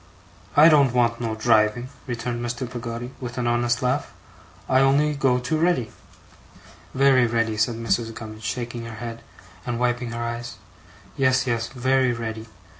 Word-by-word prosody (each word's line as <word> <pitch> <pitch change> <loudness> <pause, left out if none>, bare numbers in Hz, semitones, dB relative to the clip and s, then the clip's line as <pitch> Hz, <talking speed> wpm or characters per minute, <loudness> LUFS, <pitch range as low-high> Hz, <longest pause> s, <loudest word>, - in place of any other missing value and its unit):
I 150 +2 +9
don't 140 -6 +5
want 115 -1 +2
no 115 -2 -2
driving,' 110 +2 +2 0.2
returned 120 0 -3
Mr. 120 +2 -3
Peggotty 120 0 -6
with 120 -1 -6
an 125 - -1
honest 120 0 +1
laugh. 130 +3 0 0.6
'I 130 - +4
only 145 +3 +3
go 135 -3 +2
too 130 +6 -1
ready.' 160 -10 +1 1.0
'Very 130 -2 +5
ready,' 115 -1 0
said 110 +2 +1
Mrs. 115 0 -1
Gummidge, 110 -1 -9
shaking 120 +1 -4
her 115 -1 -7
head, 115 0 -7 0.4
and 120 -1 -3
wiping 120 0 0
her 115 0 -4
eyes. 120 +1 -5 0.6
'Yes, 130 -1 +3
yes, 115 -2 -1
very 130 0 +1
ready. 110 -1 -5
120 Hz, 155 wpm, -24 LUFS, 115-130 Hz, 1.0 s, I